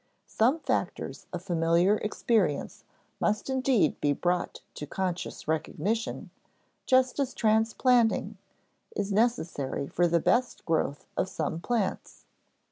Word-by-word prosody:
Some 255 +9 +2
factors - - -2
of - - -5
familiar 170 +3 +3
experience 210 -7 0 0.4
must 215 +5 0
indeed 260 - +2
be 145 -1 +3
brought 175 +4 -1
to 150 - -7
conscious 180 0 -4
recognition, 195 +8 -2 0.6
just 260 +1 +3
as 265 -2 -1
transplanting 225 +2 +2 0.6
is 200 - -2
necessary 175 - 0
for 175 +5 +1
the 170 0 +2
best 245 +8 +1
growth 155 -3 -1
of 190 - 0
some 160 -3 -3
plants. 220 +1 -2
200 Hz, 115 wpm, -28 LUFS, 165-235 Hz, 0.6 s, familiar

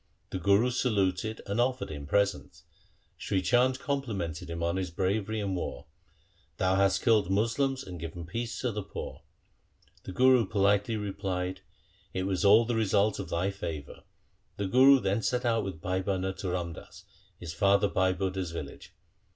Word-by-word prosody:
The 95 - -3
Guru 100 +7 +3
saluted 110 -3 0
and 100 +4 0
offered 130 -6 -1
him 70 -2 -7
presents. 100 +3 0 0.6
Sri 95 - 0
Chand 125 +6 +3
complimented 110 - -3
him 85 0 -4
on 85 +2 0
his 95 -1 -2
bravery 100 +5 -1
in 100 -2 -2
war: 80 -7 -4 0.4
' 85 -3 -37
Thou 95 0 +2
hast 95 0 +2
killed 110 -6 +3
Moslems 120 +7 +1
and 90 -7 -8
given 85 +1 -6
peace 115 +7 -4
to 125 - 0
the 105 0 -3
poor.' - - -7 0.8
The - - -7
Guru 125 +2 +4
politely 100 +2 +2
replied, 95 -2 -3 0.3
' - - -34
It 95 - 0
was 95 -1 -1
all 105 +3 +6
the 120 - -1
result 105 -2 +2
of 95 -4 -5
thy 90 +4 0
favour.' 80 -7 -6 0.6
The 100 - -2
Guru 130 +7 +6
then 100 +1 0
set 125 +3 -1
out 115 -1 +2
with 95 -5 -6
Bhai 95 +2 -1
Bhana 95 0 -1
to 95 - -4
Ramdas, 90 -2 -5 0.4
his 85 -2 -6
father 100 +5 +3
Bhai 95 -1 +2
Budha's 95 -2 -2
village. 85 - -8
100 Hz, 170 wpm, -29 LUFS, 90-110 Hz, 0.8 s, all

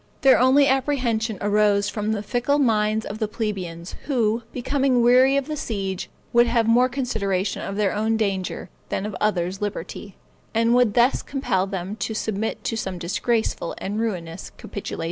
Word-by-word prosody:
Their 270 -2 +6
only 260 +3 +5
apprehension 250 -5 0
arose 205 0 +3
from 210 +1 -2
the 210 -1 -2
fickle 245 +6 0
minds 220 -5 +2
of 210 +2 -6
the 215 - 0
plebeians, 190 -6 -4
who, 235 -5 +1
becoming 260 -1 +1
weary 255 +3 +5
of 280 - 0
the 305 - -4
siege, 195 -8 -3 0.2
would 240 0 +5
have 230 -1 +2
more 245 +3 +4
consideration 205 -7 -1
of 195 - -4
their 205 -2 +1
own 220 +2 0
danger 195 -4 -2 0.2
than 195 - -2
of 210 -2 -5
other's 190 -2 0
liberty, 205 -1 -5 0.4
and 230 +1 +3
would 245 -4 +3
thus 240 +2 +4
compel 235 -9 -1
them 195 +2 -5
to 220 +1 -3
submit 220 0 -2
to 225 - -2
some 190 -4 -3
disgraceful 195 +2 -1
and 205 +3 -3
ruinous 180 -6 -4
capitulation. 200 - -6
220 Hz, 165 wpm, -23 LUFS, 200-245 Hz, 0.4 s, Their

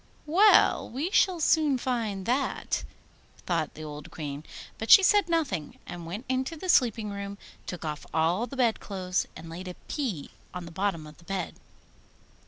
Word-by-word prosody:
'Well, 380 +8 +5
we 290 +10 -3
shall 370 -4 +3
soon 305 -3 +3
find 225 -7 -2
that!' 255 +5 0 0.6
thought - - -1
the 155 - -8
old 150 +1 -8
Queen. 145 -3 -6 0.4
But 220 - -4
she 390 - +10
said 405 -2 +4
nothing, 310 - -1
and 170 -1 -7
went 205 +9 -6
into 260 +5 -1
the 370 +4 -6
sleeping 225 -8 +3
room, 200 0 -5 0.3
took 175 -2 -5
off 150 -1 -5
all 170 +9 +1
the 275 - -9
bed 235 -4 +2
clothes, 185 -2 -2
and 160 +1 -9
laid 175 +3 -7
a 180 - -6
pea 230 - -3 0.2
on 180 -1 -5
the 165 - -9
bottom 185 -3 -1
of 150 0 -13
the 170 - -18
bed. 190 -2 -3
200 Hz, 175 wpm, -28 LUFS, 170-270 Hz, 0.6 s, she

